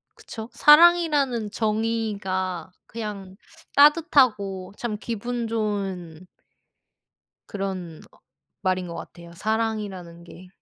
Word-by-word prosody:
그쵸. 220 Hz, 0 st, -9 dB
사랑이라는 295 Hz, -8 st, +5 dB
정의가 210 Hz, -5 st, -2 dB, 0.2 s
그냥 205 Hz, -4 st, -7 dB, 0.4 s
따뜻하고 255 Hz, -, +3 dB
참 225 Hz, -3 st, -3 dB
기분 235 Hz, +2 st, -4 dB
좋은 195 Hz, -6 st, -3 dB, 1.2 s
그런 190 Hz, -5 st, -5 dB
어 -, -, -23 dB, 0.4 s
말인 185 Hz, -2 st, 0 dB
것 170 Hz, -, -7 dB
같아요, 170 Hz, 0 st, -10 dB
사랑이라는 205 Hz, -4 st, -3 dB
게. 180 Hz, +2 st, -13 dB
210 Hz, 205 characters per minute, -24 LUFS, 185-230 Hz, 1.2 s, 사랑이라는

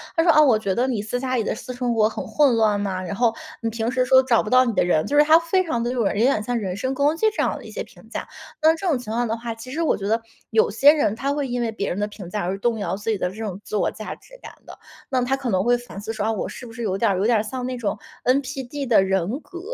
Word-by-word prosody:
他 330 Hz, -, +3 dB
说： 335 Hz, -, +6 dB
“啊， 305 Hz, -, +6 dB
我 260 Hz, -7 st, +5 dB
觉 200 Hz, -3 st, -1 dB
得 245 Hz, +6 st, +1 dB
你 235 Hz, -5 st, -1 dB
私 220 Hz, +4 st, -3 dB
下 255 Hz, 0 st, -2 dB
里 235 Hz, -, +1 dB
的 -, -, -1 dB
私 250 Hz, +3 st, -7 dB
生 245 Hz, -1 st, -1 dB
活 215 Hz, -2 st, +3 dB
很 220 Hz, -, -5 dB
混 285 Hz, -5 st, +3 dB
乱 215 Hz, -2 st, +2 dB
呐， 190 Hz, -2 st, -2 dB
然 185 Hz, -, -4 dB
后 230 Hz, +2 st, +2 dB, 0.3 s
你 230 Hz, -, -1 dB
平 225 Hz, +1 st, -2 dB
时 255 Hz, 0 st, +1 dB
说 260 Hz, +1 st, +6 dB
找 245 Hz, -3 st, +3 dB
不 210 Hz, -, -6 dB
到 255 Hz, +2 st, +6 dB
你 245 Hz, -, 0 dB
的 205 Hz, -, +1 dB
人 155 Hz, -3 st, +2 dB
“就 290 Hz, -, 0 dB
是 295 Hz, -, +8 dB
他 315 Hz, +2 st, +7 dB
非 350 Hz, +3 st, +1 dB
常 235 Hz, -8 st, -1 dB
地 240 Hz, -, -1 dB
就 255 Hz, -, -4 dB
是 200 Hz, -, 0 dB
有 -, -, +1 dB
点 260 Hz, -3 st, +3 dB
像 245 Hz, +3 st, -2 dB
人 190 Hz, -4 st, -3 dB
身 260 Hz, +6 st, -2 dB
攻 285 Hz, +4 st, +1 dB
击 440 Hz, -, +2 dB
这 -, -, +1 dB
样 -, -, -1 dB
的 -, -, -12 dB
一 -, -, -10 dB
些 -, -, -4 dB
评 -, -, -18 dB
价。 -, -, -5 dB, 0.4 s
那 315 Hz, +1 st, +6 dB
这 375 Hz, +3 st, -4 dB
种 305 Hz, -, +2 dB
情 240 Hz, -3 st, -7 dB
况 240 Hz, +2 st, 0 dB
的 225 Hz, -, -1 dB
话， 230 Hz, 0 st, -5 dB
其 225 Hz, +3 st, -11 dB
实 305 Hz, +6 st, -3 dB
我 325 Hz, -, +2 dB
觉 195 Hz, -, -4 dB
得 225 Hz, +2 st, +1 dB, 0.3 s
有 220 Hz, -2 st, +3 dB
些 275 Hz, +8 st, +6 dB
人 290 Hz, -9 st, +1 dB
他 275 Hz, +5 st, -2 dB
会 290 Hz, -1 st, -1 dB
因 245 Hz, 0 st, -2 dB
为 230 Hz, -2 st, -1 dB
别 200 Hz, -2 st, -3 dB
人 180 Hz, -, -3 dB
的 205 Hz, -, 0 dB
评 205 Hz, -4 st, -10 dB
价 210 Hz, +3 st, -3 dB
而 190 Hz, +2 st, -2 dB
动 225 Hz, +2 st, 0 dB
摇 190 Hz, -3 st, -2 dB
自 205 Hz, +3 st, -5 dB
己 220 Hz, -, +1 dB
的 180 Hz, -, -1 dB
这 190 Hz, -, -11 dB
种 210 Hz, -4 st, -5 dB
自 -, -, -5 dB
我 205 Hz, -, +2 dB
价 215 Hz, -, -7 dB
值 -, -, -17 dB
感 -, -, -9 dB
的， -, -, -11 dB, 0.3 s
那 260 Hz, -2 st, +1 dB
他 260 Hz, +2 st, +1 dB
可 270 Hz, -2 st, -4 dB
能 185 Hz, -3 st, +1 dB
会 240 Hz, +2 st, +3 dB
反 240 Hz, -4 st, -10 dB
思 215 Hz, +2 st, -5 dB
说， 210 Hz, -, -2 dB
哦， 225 Hz, -, +2 dB
我 215 Hz, -, -3 dB
是 -, -, -9 dB
不 -, -, -11 dB
是 235 Hz, +1 st, -6 dB
有 195 Hz, -4 st, -1 dB
点 225 Hz, +2 st, +2 dB
儿 190 Hz, -, 0 dB
有 195 Hz, -, 0 dB
点 235 Hz, -1 st, +4 dB
儿 210 Hz, -, 0 dB
像 250 Hz, +3 st, -5 dB
那 255 Hz, 0 st, -3 dB
种 225 Hz, -4 st, -2 dB, 0.3 s
NPD 270 Hz, +1 st, -1 dB
的 230 Hz, -6 st, +4 dB
人 190 Hz, -, 0 dB
格， 350 Hz, -, -10 dB
235 Hz, 360 characters per minute, -23 LUFS, 210-260 Hz, 0.4 s, 是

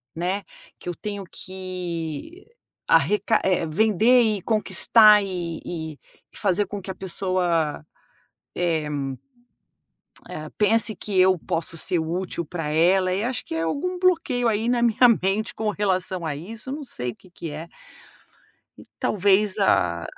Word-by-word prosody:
né, 180 Hz, +4 st, -1 dB, 0.4 s
que -, -, -7 dB
eu 175 Hz, -, -4 dB
tenho 205 Hz, +1 st, -5 dB
que 185 Hz, -, -6 dB, 0.4 s
arreca 205 Hz, +8 st, +3 dB, 0.3 s
vender 220 Hz, +7 st, +4 dB
e 215 Hz, -3 st, 0 dB
conquistar 215 Hz, +1 st, +5 dB
e 170 Hz, -4 st, -5 dB, 0.4 s
fazer 205 Hz, 0 st, +1 dB
com 205 Hz, +1 st, -6 dB
que 190 Hz, -, -10 dB
a -, -, -9 dB
pessoa, 175 Hz, -5 st, -1 dB, 0.7 s
eh 165 Hz, -3 st, 0 dB, 1.4 s
eh, 155 Hz, 0 st, -7 dB
pense 220 Hz, +1 st, +4 dB
que 195 Hz, 0 st, -3 dB
eu 185 Hz, 0 st, +5 dB
posso 165 Hz, 0 st, -3 dB
ser 175 Hz, -, -1 dB
útil 170 Hz, +1 st, -3 dB
para 165 Hz, -1 st, -5 dB
ela, 180 Hz, +4 st, +3 dB
e 200 Hz, +3 st, -1 dB
acho 245 Hz, 0 st, -1 dB
que -, -, -6 dB
é 165 Hz, -, -1 dB
algum 360 Hz, -, -2 dB
bloqueio 330 Hz, -9 st, +1 dB
aí 220 Hz, +1 st, 0 dB
na 240 Hz, -1 st, +1 dB
minha 240 Hz, +1 st, +5 dB
mente 200 Hz, +4 st, -1 dB
com 215 Hz, -1 st, -1 dB
relação 185 Hz, -4 st, -1 dB
a 150 Hz, -2 st, -2 dB
isso, 215 Hz, -, -8 dB
eu -, -, -2 dB
não 295 Hz, 0 st, -6 dB
sei 125 Hz, -, -3 dB
o -, -, -20 dB
que 185 Hz, -, -20 dB
que 170 Hz, -2 st, -7 dB
é. 155 Hz, +3 st, -7 dB, 1.1 s
E -, -, -13 dB, 0.2 s
talvez 205 Hz, 0 st, +2 dB
a 85 Hz, -, +2 dB
190 Hz, 145 wpm, -24 LUFS, 170-215 Hz, 1.4 s, conquistar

